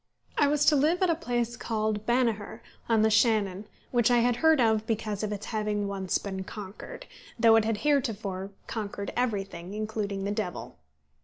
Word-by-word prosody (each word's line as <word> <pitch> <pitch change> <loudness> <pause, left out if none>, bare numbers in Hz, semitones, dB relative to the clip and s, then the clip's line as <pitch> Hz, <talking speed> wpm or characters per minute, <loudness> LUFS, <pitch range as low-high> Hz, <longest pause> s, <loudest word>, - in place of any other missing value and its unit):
I 290 - +4
was 295 0 +2
to 300 - +6
live 320 +7 +2
at 360 - +4
a - - +1
place 240 -7 -2
called 215 -2 -2
Banagher, 235 -4 0 0.3
on 225 -2 +4
the 220 - +3
Shannon, 210 -3 +2 0.2
which 240 -2 +3
I 245 - +4
had 240 0 +2
heard 320 +2 +4
of 220 -2 +2
because 215 -2 -2
of 215 -1 -2
its 210 0 -5
having 210 -2 -1
once 190 -2 -1
been 190 -2 -5
conquered, 200 0 -9 0.3
though 225 0 +6
it 225 -1 +4
had 225 -1 0
heretofore 215 -9 0 0.2
conquered 200 -3 -5
everything, 195 -6 -2
including 210 -2 -3
the 200 - -1
devil. 180 - -4
215 Hz, 175 wpm, -28 LUFS, 200-240 Hz, 0.3 s, to